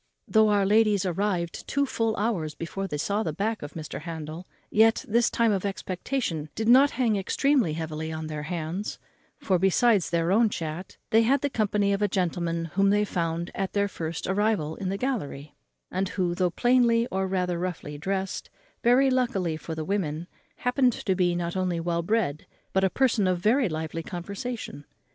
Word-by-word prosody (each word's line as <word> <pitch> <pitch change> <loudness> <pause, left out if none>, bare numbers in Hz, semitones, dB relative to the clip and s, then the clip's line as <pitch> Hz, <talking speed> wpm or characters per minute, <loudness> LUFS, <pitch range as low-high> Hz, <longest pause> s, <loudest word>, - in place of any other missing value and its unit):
Though 220 -1 +4
our 205 -1 +3
ladies 210 -1 +3
arrived 180 -2 -2
full 280 0 +2
two 225 -4 -1
hours 190 -9 -1
before 195 +4 -4
they 150 - -3
saw 200 +8 0
the - - -1
back 215 +2 -2
of 145 - -7
Mr. 155 -3 -6
Handel, 160 +1 -7 0.2
yet 225 +1 +4
this 235 +2 +3
time 230 -1 +2
of 195 -3 0
expectation 185 - -3
did 220 - -2
not 265 +4 +7
hang 230 -5 +2
extremely 245 - +2
heavy 160 0 -4
on 160 0 -4
their 155 -1 -4
hands; 170 +5 -4 0.4
for, 185 -3 +1
besides 195 +1 +3
their 170 0 +1
own 220 +2 +4
chat, 165 0 -5
they 225 - +6
had 260 +4 +3
the 285 - -1
company 205 -3 +1
of 200 - 0
the 205 - +2
gentleman 170 -3 -1
whom 195 +1 +3
they 205 +1 +3
found 170 -2 -2
at 195 -1 -3
their 200 0 +2
first 165 -4 -5
arrival 190 -6 0
in 190 - -3
the 195 - -2
gallery, 155 - -3 0.4
and 190 +1 -1
who, 180 -3 -1
though 180 0 +1
plainly, 235 +3 +3
or 190 0 0
rather 180 -2 -1
roughly 160 -5 -4
dressed, 190 +3 -3 0.3
very 260 +3 +4
luckily 220 -10 0
for 160 +1 -6
the 160 -1 -4
women, 170 -5 -2 0.3
happened 250 0 +2
to 190 - -1
be 175 -1 +1
not 170 0 -2
only 180 -2 0
well 170 0 -1
bred, 170 -6 -1 0.3
but 190 - +2
a 190 - +4
person 230 -4 +2
of 185 -1 +2
very 225 +5 +2
lively 160 0 -4
conversation. 200 +1 -6
190 Hz, 185 wpm, -26 LUFS, 170-220 Hz, 0.4 s, not